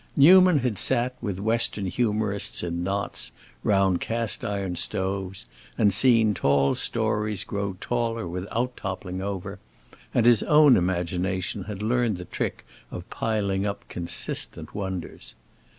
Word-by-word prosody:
Newman 180 +3 +7
had 125 -7 0
sat 125 +2 +3
with 100 -6 -3
Western 110 0 0
humorists 105 -1 -1
in 85 0 -3
knots, 95 -10 -1 0.3
round 95 -3 +2
cast 115 -1 -1
iron 100 -3 -3
stoves, 95 +2 -2 0.3
and 105 -2 +3
seen 115 -1 +5
"tall" 70 -4 +2
stories 105 -1 -1
grow 100 -5 -4
taller 115 -4 -2
without 105 +8 -3
toppling 95 -1 -5
over, 95 -2 -5 0.5
and 120 - +1
his 120 -3 +5
own 150 -3 +6
imagination 90 +1 -1
had 105 0 -6
learned 115 -2 +1
the 90 - -8
trick - - -4 0.2
of 90 - -8
piling 100 -3 -1
up 100 - -6
consistent 85 -1 -3
wonders. 95 -4 -6
100 Hz, 130 wpm, -25 LUFS, 95-115 Hz, 0.5 s, Newman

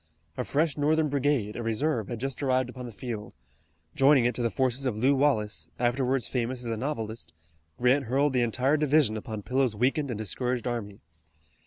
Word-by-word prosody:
A - - -2
fresh 155 +1 0
Northern 155 +1 +2
brigade, 140 -6 0
a - - -4
reserve, 115 0 -1
had 120 - -5
just 135 +2 -4
arrived 130 -2 +1
upon 125 -1 -7
the - - -8
field. 110 - -6 0.6
Joining 135 -2 +5
it 120 - +2
to - - -4
the 115 - +1
forces 130 +1 0
of 110 -4 -2
Lew 130 +5 +3
Wallace, 105 - +1
afterwards 125 +1 +1
famous 125 0 -2
as 115 - -2
a - - 0
novelist, 115 -3 -4 0.4
Grant 130 +3 +3
hurled 135 +4 +1
the 125 - +2
entire 130 +5 +2
division 150 -6 +3
upon 110 -1 -5
Pillow's 130 -2 +1
weakened 135 +6 +1
and 120 - -3
discouraged 120 +4 -2
army. 110 -5 -4
125 Hz, 185 wpm, -28 LUFS, 115-140 Hz, 0.6 s, Joining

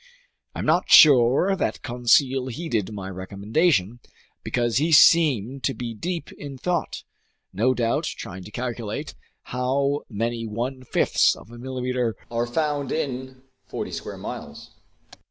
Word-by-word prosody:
I'm - - -4
not - - +2
sure 140 +6 +7
that - - -3
Conseil 130 +1 +2
heeded 115 - -3
my 100 -3 -6
recommendation, 100 - 0 0.4
because 120 -1 0
he 155 +4 +1
seemed 140 -6 +5
to 135 - 0
be 120 -2 -5
deep 170 +9 -5
in 140 -2 -9
thought, 175 +5 -2 0.5
no 120 +7 +2
doubt 115 -1 0
trying 95 +1 -6
to - - -9
calculate 120 -2 -5 0.4
how 140 +3 0
many 115 +1 -3
one 125 +5 -4
fifths - - +2
of 115 - -15
a 120 - -11
millimeter 125 -2 -2 0.2
are 120 0 -1
found 145 +1 -1
in 130 -3 -4 0.2
forty - - -5
square - - -6
miles. - - -8
125 Hz, 135 wpm, -24 LUFS, 115-140 Hz, 0.5 s, sure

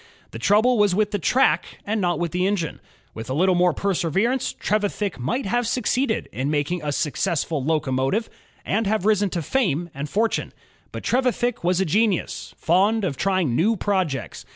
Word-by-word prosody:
The 115 - -7
trouble 215 - +3
was 205 -3 +3
with 210 0 +1
the 205 - -1
track 255 +10 +2
and 215 +1 -1
not 175 -3 +1
with 170 0 -2
the 180 +2 +1
engine. 190 -6 -2 0.3
With 110 +2 -8
a - - -1
littie 185 +5 +3
more 180 0 +4
perseverance, 195 - 0
Trevithick 205 -4 -2
might 240 - -2
have 240 +4 0
succeeded 250 0 0
in 135 +3 -2
making 150 +4 -1
a 150 - -1
successful 150 0 -1
locomotive 145 - 0 0.4
and 215 +1 0
have 215 -2 0
risen 210 -2 +3
to 170 -3 -3
fame 175 - 0
and 140 +2 -5
fortune. 225 +6 0 0.4
But - - -7
Trevithick 245 -3 0
was 180 +1 +2
a 190 - +2
genius, 200 +3 0
fond 200 +6 +2
of 165 -7 -1
trying 185 -7 0
new 215 - +2
projects. 185 - -2
190 Hz, 175 wpm, -23 LUFS, 160-215 Hz, 0.4 s, more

